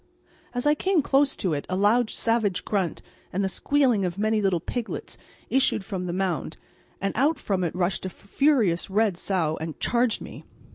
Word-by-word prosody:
As 245 - -1
I 295 - +5
came 365 0 +1
close 275 +1 +3
to 180 -4 -1
it 145 - -3
a 185 - -1
loud 215 +4 +3
savage 225 -5 0
grunt 190 -6 -1 0.3
and 195 +2 -1
the - - +2
squealing 255 0 +2
of 180 0 -2
many 215 +1 +1
little 190 -4 +2
piglets 235 +7 -5 0.4
issued 265 -6 +2
from 185 -3 -4
the - - -2
mound, 180 -3 -2 0.4
and 195 0 -1
out 290 +7 +2
from 190 -3 -1
it 170 - -2
rushed 185 +1 -1
a - - -4
furious 200 - +1
red 205 -1 +2
sow 170 -4 -1
and 160 -1 -5
charged 240 -1 +1
me. - - -10
200 Hz, 185 wpm, -25 LUFS, 180-245 Hz, 0.4 s, I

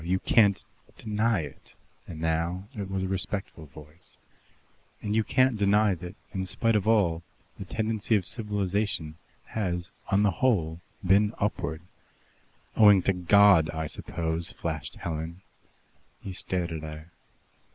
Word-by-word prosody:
You 90 +3 +1
can't 100 0 +3 0.3
deny 110 -2 0
it" 75 -3 -8 0.3
(and 80 - -8
now 85 +4 -1
it 100 -5 -5
was 95 -1 -2
a - - -1
respectful 95 -3 -4
voice) 75 +5 -14 0.8
"and 105 0 -2
you 110 - +3
can't 130 -1 +2
deny 100 +1 +4
that, 90 +1 -8 0.2
in 95 - -2
spite 115 +3 +1
of 105 -1 +1
all, 95 -7 +3 0.4
the 100 - -6
tendency 110 +2 0
of 95 -4 0
civilization 100 -7 -2 0.3
has 90 -5 -3 0.2
on 100 +1 +3
the 100 - +3
whole 85 -6 0 0.2
been 100 +3 +3
upward." 80 -5 -2 0.9
"Owing 105 -4 +7
to 95 - +2
God, 90 -2 +5
I 80 0 -3
suppose," 80 +2 -3
flashed 80 -6 -5
Helen. 85 +2 -5 0.8
He 95 - -7
stared 90 -1 -1
at 80 -1 -4
her. 80 +1 -9
95 Hz, 140 wpm, -27 LUFS, 80-105 Hz, 0.9 s, Owing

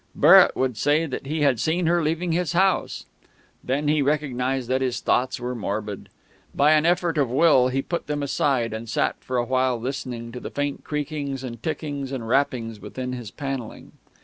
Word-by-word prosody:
Barrett - - +7
would 130 -4 -1
say 150 +7 +2
that 135 -2 -6
he 155 +2 -2
had 135 -5 +3
seen 170 +6 0
her 170 +1 +3
leaving 165 +3 -1
his 175 +1 0
house.... 190 +2 +1 0.6
Then 140 +3 -1
he 150 0 +3
recognised 135 -3 -1
that 130 +1 0
his 130 -2 -1
thoughts 130 0 0
were 125 +1 -3
morbid. 105 -2 -4 0.5
By 145 +2 +4
an 155 +1 +4
effort 170 -2 +1
of 135 -4 +2
will 130 -1 +4
he 135 +1 -1
put 170 - -4
them 145 -1 -2
aside, 130 -4 0
and 110 +1 -6
sat - - 0
for 130 - -2
a 120 - +1
while 130 -1 +1
listening 120 -2 -5
to 125 - -7
the - - -7
faint 145 0 -3
creakings 145 -3 -4
and 120 -3 -7
tickings 145 -4 -4
and 125 -4 -4
rappings 120 -4 0
within 125 +4 -6
his 120 -4 -6
panelling.... 135 -2 -6
135 Hz, 190 wpm, -24 LUFS, 125-150 Hz, 0.6 s, Barrett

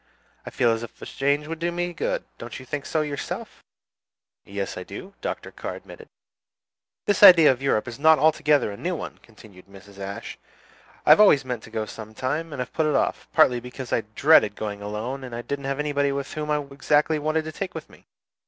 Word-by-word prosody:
I - - -2
feel 120 - +2
as 115 0 -1
if 115 - -10
a - - -8
change 140 +2 0
would 165 0 -5
do 170 +1 -1
me 175 0 -2
good. - - -2 0.2
Don't - - -7
you 130 - -11
think 140 +2 -5
so 160 - 0
yourself?" 145 -2 -5 0.8
"Yes, 100 0 -5
I - - -6
do," 185 - -9
Dr. - - -5
Carr - - -6
admitted. - - -12 1.0
"This 205 -2 +1
idea 175 -7 +10
of 130 0 -4
Europe 130 -4 +1
is 120 +2 -7
not 160 +1 +6
altogether 150 -4 +3
a 100 - -8
new 180 - -2
one," - - -7
continued 105 -5 -17
Mrs. 100 0 -15
Ashe. 100 0 -7 0.7
"I - - +6
have - - +8
always 145 -10 +6
meant 125 -3 -4
to - - -13
go 110 -1 -3
some 110 0 -10
time, 150 +7 -2
and 140 - -6
have 125 - -4
put 160 -1 +1
it 150 - +1
off, - - 0
partly 125 -1 +4
because 125 +1 -7
I - - +2
dreaded 140 -9 +5
going 105 -1 -5
alone, 110 +6 -4
and 120 -2 -7
didn't 140 -1 -4
know 135 0 -2
anybody 145 -1 0
whom 140 +2 -4
I 150 0 +2
exactly 150 +2 +2
wanted 155 +1 0
to 160 - -5
take 185 +3 -5
with 160 - -7
me. - - -20
140 Hz, 210 wpm, -24 LUFS, 115-155 Hz, 1.0 s, idea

